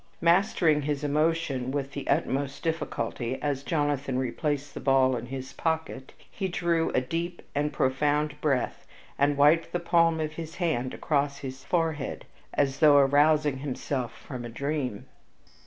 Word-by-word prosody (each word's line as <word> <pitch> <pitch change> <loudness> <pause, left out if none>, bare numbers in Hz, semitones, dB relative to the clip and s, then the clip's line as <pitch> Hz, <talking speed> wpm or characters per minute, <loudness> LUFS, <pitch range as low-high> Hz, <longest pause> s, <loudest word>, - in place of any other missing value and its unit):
Mastering 170 -3 +3
his 145 0 -2
emotion 150 -3 0
with 140 0 -2
the 140 -1 -6
utmost 140 -2 0
difficulty 135 -6 -2
as 145 -2 -1
Jonathan 145 -3 -1
replaced 145 +3 -2
the - - -6
ball 135 -1 +3
in 120 0 -5
his 130 0 -6
pocket, 160 -5 -3
he 190 - -5
drew 170 -2 0
a 130 - +3
deep 170 +6 -4
and 150 +1 0
profound 150 +3 0
breath 140 -5 -1 0.3
and 140 0 +3
wiped 150 +4 +4
the 175 - +1
palm 170 -1 +3
of 155 0 -2
his 165 0 -7
hand 150 -8 -1
across 140 -2 0
his 130 0 -7
forehead 160 -5 -1 0.3
as 140 -1 0
though 150 -2 +7
arousing 145 0 +4
himself 130 -3 -3
from 130 -3 -7
a 120 - -6
dream. 135 -3 -3
145 Hz, 150 wpm, -27 LUFS, 135-160 Hz, 0.3 s, though